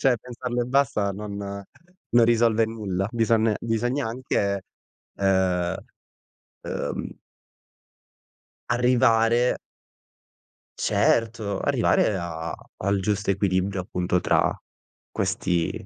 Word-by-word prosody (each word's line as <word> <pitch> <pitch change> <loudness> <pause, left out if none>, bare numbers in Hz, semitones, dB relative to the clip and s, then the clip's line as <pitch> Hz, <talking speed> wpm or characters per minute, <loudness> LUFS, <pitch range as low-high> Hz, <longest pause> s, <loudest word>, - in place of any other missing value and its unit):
cioè, 130 -2 +4
pensarlo 125 0 -3
e - - -2
basta, 125 -6 +1
non 100 0 -6 0.5
non 120 -1 +6
risolve 115 -1 +3
nulla. 100 -4 -2
Bison 115 -1 +2
bisogna 120 +4 -1
anche, 100 -5 -1 0.6
uhm, 95 -3 +1 0.9
uhm - - -4 1.5
arrivare 120 -1 +3 1.2
Certo, 110 -4 +1
arrivare 105 - +2
a 85 -2 -4 0.2
al 100 +1 0
giusto 100 0 0
equilibrio, 95 0 0
appunto, 90 0 -1
tra - - +2 0.5
questi 85 -2 0
105 Hz, 85 wpm, -25 LUFS, 95-120 Hz, 1.5 s, non